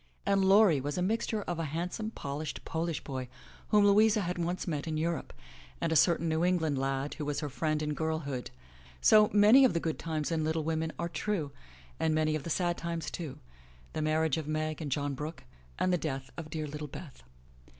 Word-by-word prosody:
And 195 -1 +3
Laurie 190 -6 +6
was 145 +4 -3
a - - 0
mixture 215 +1 0
of 175 -3 -3
a 165 - -1
handsome, 175 +8 -3
polished, 145 -6 -5
Polish 165 0 -2
boy 130 -3 -5 0.4
whom 210 -1 +5
Louisa 210 +1 +5
had 180 -1 -3
once 175 +2 -2
met 150 -2 -2
in 155 -1 -1
Europe, 165 +1 -2 0.5
and - - -1
a - - +2
certain 170 +1 +4
New 160 +1 +1
England 160 -6 +1
lad 135 +1 -1
who 150 - -5
was 145 +1 -2
her 150 - -3
friend 155 +2 -1
in 150 0 -1
girlhood. 155 -5 -3 0.5
So, 210 - +6
many 210 +6 +7
of 255 - +4
the - - +3
good 160 -1 -3
times 160 -1 -2
in 160 -1 0
Little 160 0 0
Women 160 0 -1
are 170 - -2
true, 170 -4 -2 0.5
and 160 -1 +2
many 155 0 +2
of 155 - -1
the 170 - -6
sad 175 +1 0
times 170 -2 -3
too, 160 -6 -6 0.3
— 65 0 -26
the - - -2
marriage 155 -1 +1
of 155 -2 -4
Meg 155 +1 -2
and 145 -3 -4
John 145 +1 -1
Brooke, 150 +4 -6 0.3
and 185 - +1
the 180 - +2
death 135 -2 -4
of 165 -2 -7
dear 155 0 -3
little 150 +1 -6
Beth. 140 - -10
160 Hz, 210 wpm, -31 LUFS, 150-175 Hz, 0.5 s, many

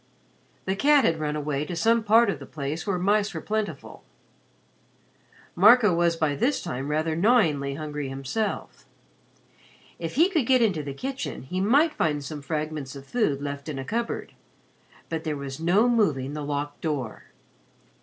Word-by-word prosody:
The 190 - 0
cat 285 +6 +4
had 160 -1 +1
run 150 -1 -2
away 150 -1 -2
to 170 +3 -5
some 230 +6 +2
part 225 +2 +5
of 140 - -6
the 140 - -10
place 150 +5 -5
where 195 -2 0
mice 205 +3 +1
were - - -2
plentiful. 210 -8 -4 1.5
Marco 210 +2 +6
was 170 0 +2
by 155 -3 0
this 250 - +1
time 135 -5 -4
rather 155 +1 0
gnawingly 160 - +2
hungry 150 -2 -5
himself. 135 - -4 1.1
If 165 +4 -5
he 330 +6 +5
could 320 -11 0
get 260 -1 +5
into 190 -8 +1
the 140 -2 -6
kitchen, 270 - -5
he 180 +8 -3
might 285 +10 +4
find 150 - 0
some 150 0 -6
fragments 150 -2 -4
of 135 0 -10
food 145 - 0
left 140 +1 -5
in 145 - -4
a 135 - -5
cupboard; 230 - -3 0.7
but 160 -1 -4
there 155 -2 -2
was 140 0 -6
no 185 +8 +3
moving 150 - +1
the 150 - -4
locked 145 0 -4
door. 140 -8 -3
160 Hz, 165 wpm, -26 LUFS, 145-215 Hz, 1.5 s, Marco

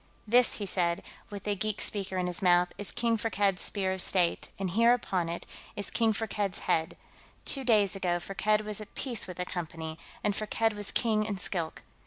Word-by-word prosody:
"This," 245 +3 +6
he 205 - -2
said, 175 -3 +1 0.3
with 200 -2 -7
the 205 -1 -1
geek 215 +1 -2
speaker 195 -2 -1
in 180 - 0
his 180 +1 0
mouth, 180 -1 +4
"is 205 - +1
King 230 -1 +1
Firkked's 205 -4 +1
Spear 190 -2 0
of 190 - -2
State, 175 -2 +2
and 190 -2 -2
here, 230 +5 +5
upon 185 -8 -2
it, 170 - -4 0.3
is 205 - -3
King 225 -1 +3
Firkked's 210 -3 -2
head. 160 0 +1 0.5
Two 270 - +2
days 210 -5 +3
ago, 180 -2 0
Firkked 210 +4 +1
was 210 0 -3
at 210 - -11
peace 245 -5 -2
with 180 - -8
the 180 - -1
Company, 165 -2 -5 0.2
and 205 - +1
Firkked 225 +1 0
was 205 -1 -3
King 220 -3 +1
in 210 -2 -3
Skilk. 170 -3 -4
200 Hz, 200 wpm, -29 LUFS, 180-215 Hz, 0.5 s, This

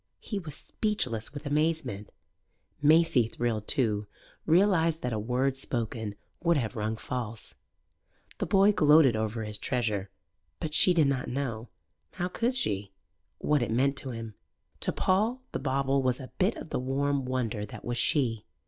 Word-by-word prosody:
He 205 - -4
was 155 -6 -7
speechless 130 - -2
with 145 +2 -8
amazement; 150 -8 0 0.7
Maisie, 155 -5 +5
thrilled 115 -2 -2
too, 105 -7 0 0.4
realized 165 -2 +3
that 125 -1 -1
a 110 - -1
word 125 +5 0
spoken 115 -5 -3 0.3
would 170 -1 +3
have 115 -6 -2
rung 110 0 -2
false. 115 -2 -5 0.9
The - - -1
boy 200 +1 +5
gloated 150 - +5
over 110 +1 -2
his 105 -1 -4
treasure; 105 -6 -1 0.5
but 155 -1 -4
she 180 +3 +5
did 160 -3 +5
not 135 -2 0
know 120 -3 -3 0.4
how 180 0 -2
could 235 +7 0
she? 100 - -1 0.4
what 150 -2 +1
it 120 - -1
meant 135 +5 +2
to 135 - -2
him. 115 -2 -6 0.5
To - - 0
Paul 220 +7 +1
the - - -3
bauble 135 0 +1
was 130 0 0
a 130 - -9
bit 190 +5 +2
of 160 - -9
the - - 0
warm 135 +2 0
wonder 125 -4 -2
that - - -10
was 120 0 -2
she. 120 -8 +1
130 Hz, 160 wpm, -29 LUFS, 115-160 Hz, 0.9 s, Maisie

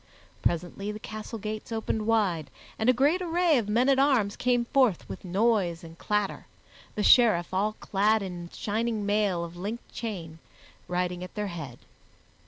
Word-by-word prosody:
Presently 180 +4 -1
the 210 - -6
castle 215 +1 -7
gates 215 +3 -6
opened 220 -1 -2
wide 185 -10 +1 0.3
and 220 +3 +2
a - - +9
great 285 +9 +2
array 345 -4 +3
of 210 -3 -4
men 240 +5 +3
at 270 -1 +4
arms 255 -8 +3
came 245 -1 +1
forth 245 -8 +2
with - - -8
noise 190 -2 +1
and 165 0 -11
clatter, 210 +2 -2 0.5
the 210 - -1
Sheriff, 215 -9 +5
all 205 +3 +1
clad 210 +1 +1
in 175 -2 -6
shining 220 0 -2
mail 205 -4 +1
of 170 0 -8
linked 210 +6 -6
chain, 175 -9 -5 0.5
riding 180 0 -2
at 180 - -10
their 210 -1 -2
head. 140 -8 -7
210 Hz, 165 wpm, -28 LUFS, 180-230 Hz, 0.5 s, a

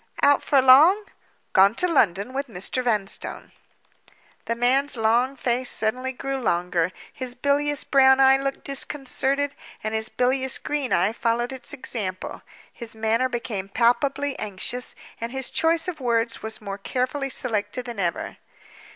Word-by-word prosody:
"Out 285 -1 +5
for 280 - +3
long?" 310 +11 +7 0.5
"Gone 195 +2 +5
to 360 - +1
London 220 - +1
with 275 +1 -3
Mr. 220 +4 -3
Vanstone." 215 -5 -2 0.9
The 230 - -1
man's 260 +3 +2
long 235 +4 +2
face 250 0 -1
suddenly 250 +4 +2
grew 270 +1 -4
longer. 180 -6 0 0.2
His 255 -2 -5
bilious 285 +2 0
brown 265 -1 +5
eye 265 0 +7
looked 275 0 -4
disconcerted, 275 0 0 0.3
and 215 0 -2
his 220 0 0
bilious 260 +1 0
green 295 -3 -3
eye 185 +5 +2
followed 235 +2 -1
its 260 - -7
example. 210 -9 -5 0.3
His 230 -2 -6
manner 225 +3 +1
became 220 -6 -4
palpably 270 +5 +1
anxious; 215 +5 -4 0.2
and 230 +1 -4
his 265 0 -3
choice 330 +1 +2
of 355 -4 -4
words 235 -2 0
was 220 0 -5
more 200 -1 -6
carefully 260 +5 -2
selected 235 -1 -1
than 235 -4 -7
ever. 170 -3 -2
250 Hz, 145 wpm, -24 LUFS, 220-275 Hz, 0.9 s, long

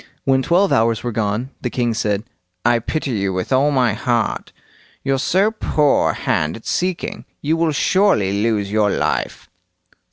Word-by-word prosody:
When 135 -1 +3
twelve 180 +7 +2
hours 115 0 +2
were 120 - -2
gone, 110 +4 -2
the 125 - -2
king 120 -1 -1
said: 105 -2 -1 0.4
"I 120 0 +4
pity 140 +4 -3
you 100 -4 -1
with 95 +7 -2
all 135 +3 +3
my 125 -6 +2
heart. 120 +1 -1 0.5
You're 135 -1 0
so 195 +9 +2
poor 150 -9 +1
a - - 0
hand 75 +1 -1
at 115 - -16
seeking; 185 -1 -2 0.2
you 155 +3 0
will 165 -1 +1
surely 115 - +2
lose 105 -3 0
your 105 -1 +2
life." - - -2
120 Hz, 165 wpm, -19 LUFS, 105-150 Hz, 0.5 s, I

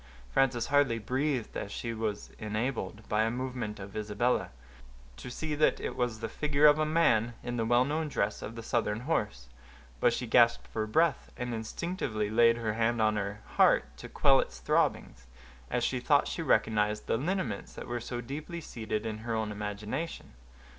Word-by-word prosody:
Frances 125 - +2
hardly 145 -5 +4
breathed, 130 +2 -1
as 100 - -4
she 115 +2 -4
was 110 -2 -3
enabled, 110 -1 -3
by 105 +1 +2
a 110 - +2
movement 125 -3 -4
of 100 0 -9
Isabella, 110 +3 0 0.7
to - - -8
see 155 +5 -4
that 150 +1 +3
it - - -4
was 120 -3 -1
the 115 - -2
figure 145 +5 +1
of 150 0 +7
a 155 - +2
man 120 -8 +3
in 120 0 -3
the 115 -1 0
well 120 +2 +4
known 155 +3 -1
dress 105 -7 -1
of 115 - -6
the 115 - -7
Southern 115 -2 0
horse; 105 - -2 0.5
but - - +4
she 125 - -2
gasped 115 0 +4
for 110 -1 -3
breath, 160 +5 +1
and 125 -1 -3
instinctively 110 - -3
laid 115 +1 +5
her 110 -2 -1
hand 115 +1 +1
on 110 -1 +3
her 105 0 -3
heart - - +3
to - - -9
quell - - +4
its 65 - -3
throbbings, - - 0 0.4
as - - 0
she - - 0
thought - - +3
she - - -3
recognized 105 -1 +1
the - - +1
lineaments 140 - -2
that - - -8
were 120 0 -3
so 120 +1 -4
deeply 150 +7 -6
seated 110 -7 -4
in 110 -1 -3
her 115 0 -3
own 110 -1 -1
imagination. 105 - -5
115 Hz, 185 wpm, -30 LUFS, 105-130 Hz, 0.7 s, of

